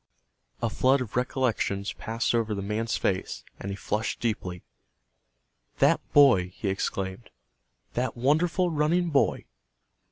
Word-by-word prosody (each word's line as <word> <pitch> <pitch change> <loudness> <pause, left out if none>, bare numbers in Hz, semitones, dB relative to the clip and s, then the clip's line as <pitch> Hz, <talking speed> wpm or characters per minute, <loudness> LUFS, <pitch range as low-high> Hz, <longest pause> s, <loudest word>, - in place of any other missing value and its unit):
A 115 - +2
flood 130 +4 +3
of 125 -4 -5
recollections 120 -6 0
passed 115 +1 -2
over 115 -2 0
the 100 - -4
man's 105 +2 -1
face, 95 -1 -2 0.2
and 100 - -5
he 100 - -3
flushed 105 +2 -2
deeply. 95 -6 -3 1.1
"That - - +4
boy!" 125 -11 +6
he 100 - -2
exclaimed. 95 +2 -3 0.6
"That 125 0 -2
wonderful 165 +7 +2
running 165 +3 +1
boy?" 140 - +2
115 Hz, 125 wpm, -27 LUFS, 100-135 Hz, 1.1 s, boy